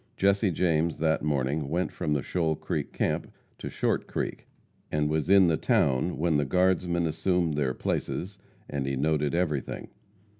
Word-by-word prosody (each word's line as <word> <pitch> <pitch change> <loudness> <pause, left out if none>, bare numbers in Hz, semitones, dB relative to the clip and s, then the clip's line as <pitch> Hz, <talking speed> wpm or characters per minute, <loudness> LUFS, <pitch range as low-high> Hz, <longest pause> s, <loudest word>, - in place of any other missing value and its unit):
Jesse 100 +1 +3
James 85 -1 +1
that 80 -1 +1
morning 70 0 -1
went 85 +4 -1
from 75 - -2
the 70 -3 0
Shoal 80 -3 0
Creek - - -3
camp - - -1 0.3
to - - -5
Short - - -1
Creek, - - -4 0.4
and 75 0 +1
was 80 +2 0
in 100 -1 +7
the 80 -2 +2
town 70 +6 +1
when 80 -1 +2
the 75 - +2
guardsmen 90 +2 +1
assumed 85 0 0
their 70 -3 0
places, 95 +3 -3 0.3
and 70 -2 -3
he 70 - -1
noted 75 +2 +1
everything. 75 -6 -2
80 Hz, 160 wpm, -28 LUFS, 75-90 Hz, 0.4 s, in